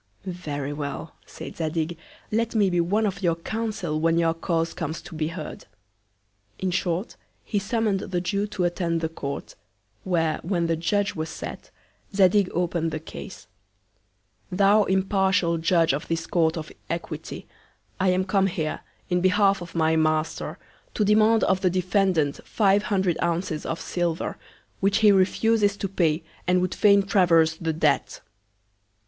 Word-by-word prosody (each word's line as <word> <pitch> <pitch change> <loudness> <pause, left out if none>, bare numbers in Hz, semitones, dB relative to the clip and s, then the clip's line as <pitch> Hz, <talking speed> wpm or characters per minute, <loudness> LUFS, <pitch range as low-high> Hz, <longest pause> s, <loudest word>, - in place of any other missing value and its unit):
Very 150 -6 -4
well! 145 +2 -5
said - - -9
Zadig, 160 +1 -2 0.4
let 230 +2 0
me 200 -4 +3
be 175 -1 +2
one 205 +6 +1
of 195 -1 -2
your 170 -3 +2
Council 190 -4 -3
when 165 +1 +2
your 165 -1 +3
Cause 165 0 -1
comes 160 0 -4
to 175 - -11
be 155 -1 -1
heard. 170 +3 -7 0.9
In 190 -1 -1
short, 180 +3 -2 0.3
he 210 - -1
summon'd 210 0 0
the 185 -2 -2
Jew 200 +3 -1
to 205 -3 -3
attend 170 -1 0
the 160 - -1
Court; 140 -3 -6 0.5
where, 165 -4 0
when 175 -1 0
the 165 0 +1
Judge 200 +5 0
was 160 0 -4
sat, - - -7 0.5
Zadig 195 0 +4
open'd 170 -1 0
the 155 0 -4
Cause: 155 - -9 1.1
Thou 200 +3 +4
impartial 190 -3 +2
Judge 165 -2 +3
of 145 - -3
this 165 0 -2
Court 165 -1 +1
of 155 -1 -6 0.2
Equity, 170 +1 -5 0.5
I 190 0 +3
am 185 +1 +2
come 195 0 +2
here, 165 -5 -2 0.3
in 180 0 +2
behalf 195 +1 +3
of 175 -1 -9
my 160 -1 +2
Master, 155 0 0 0.4
to 210 - +2
demand 215 +2 +4
of 190 0 +2
the 185 - +3
Defendant 180 -4 +1
five 200 -1 +2
hundred 190 -4 0
Ounces 170 -2 -1
of 165 - -3
Silver, 175 -2 -2 0.4
which 195 +1 +2
he 210 - +8
refuses 205 +2 +3
to 200 - -2
pay, 165 -4 +1 0.2
and 180 0 +4
would 180 0 -1
fain 200 -2 +5
traverse 165 -5 +4
the 165 -1 -1
Debt. 155 -2 0
180 Hz, 155 wpm, -25 LUFS, 165-195 Hz, 1.1 s, he